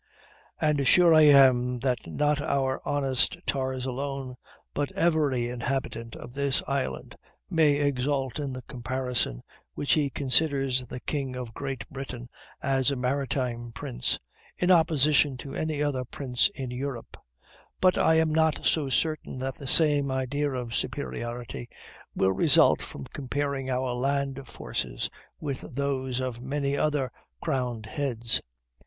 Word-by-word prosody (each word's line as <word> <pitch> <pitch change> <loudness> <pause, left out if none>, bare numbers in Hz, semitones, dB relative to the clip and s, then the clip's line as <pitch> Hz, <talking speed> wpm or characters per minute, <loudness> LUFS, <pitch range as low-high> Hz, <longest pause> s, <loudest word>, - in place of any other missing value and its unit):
And 150 -3 +2
sure 175 +1 +7
I 155 -1 +7
am 130 -3 +6
that 125 -8 -1
not 145 - +1
our 135 -2 0
honest 135 +3 +1
tars 130 -1 -1
alone, 135 0 -4 0.4
but 145 -1 -1
every 150 -8 +2
inhabitant 120 -2 -3
of 120 - -10
this 140 0 +2
island, 135 - -3 0.4
may 155 -3 +4
exult 140 -1 0
in 140 -2 -3
the 130 -1 -7
comparison, 125 - -2 0.3
when - - -4
he 145 0 +3
considers 135 -2 +1
the 125 - -7
king 135 -4 -3
of 125 -3 -6
Great 135 -4 -5
Britain 125 -3 -7 0.3
as 135 0 +2
a 140 - 0
maritime 125 -2 -2
prince, - - 0 0.4
in 180 +1 +2
opposition 150 -4 +4
to 135 +2 -8
any 155 -2 -1
other 135 -3 -1
prince 125 +3 +1
in 130 -3 -5
Europe; 125 -1 -5 0.6
but 185 -1 +4
I 160 - +4
am 160 -1 +3
not 160 -1 +2
so 150 -4 +2
certain 155 0 0
that 130 +1 -3
the 140 - -8
same 145 -2 +4
idea 135 +2 -1
of 125 -3 -4
superiority 110 - -4 0.5
will 95 - +3
result - - +5
from 70 - -7
comparing 140 0 -2
our 130 -1 0
land 135 +1 -1
forces - - -4 0.3
with 140 -3 -4
those 130 -2 -1
of 125 -2 -3
many 140 +1 -1
other 145 -3 0 0.3
crowned 125 -4 -2
heads. 120 -1 0
135 Hz, 140 wpm, -27 LUFS, 125-145 Hz, 0.6 s, sure